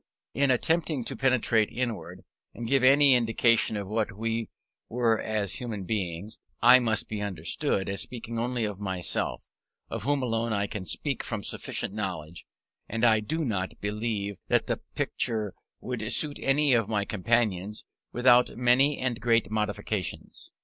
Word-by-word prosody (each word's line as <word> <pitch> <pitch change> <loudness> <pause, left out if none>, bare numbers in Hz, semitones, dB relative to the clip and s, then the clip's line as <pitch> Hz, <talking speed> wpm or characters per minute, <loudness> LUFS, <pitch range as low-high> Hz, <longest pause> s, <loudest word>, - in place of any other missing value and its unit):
In 140 0 +2
attempting 155 +2 +1
to - - -5
penetrate 120 -4 +2
inward, 120 -2 -4 0.3
and 120 - -5
give 135 +1 +2
any 140 +1 +7
indication 115 -2 +3
of 100 -1 -4
what 105 -1 -2
we 115 0 -2 0.4
were 115 -2 +2
as 105 -3 -2
human 110 -5 -4
beings, 95 -1 -4 0.2
I 125 +2 +8
must 110 -4 0
be 105 -1 -4
understood 95 -1 -2
as 100 0 -1
speaking 115 -1 -5
only 120 -1 -1
of 105 -2 -4
myself, 95 -3 -2 0.4
of - - -3
whom 140 +3 0
alone 115 -1 0
I 100 -1 +1
can 100 -2 -6
speak 140 - -1
from 105 -3 -4
sufficient - - -4
knowledge; 90 -6 -5 0.4
and 115 +2 -3
I 110 -2 +5
do 155 +9 -2
not 95 -6 -3
believe 105 -1 -2
that - - +2
the - - -2
picture 110 -4 -1 0.3
would 120 -3 -3
suit 150 -2 -1
any 140 0 +3
of 115 -3 +2
my 105 -2 0
companions 105 -2 0 0.3
without 125 0 +4
many 125 +4 +4
and 125 -3 -2
great 115 -4 +2
modifications. 105 -1 -3
115 Hz, 155 wpm, -28 LUFS, 105-125 Hz, 0.4 s, I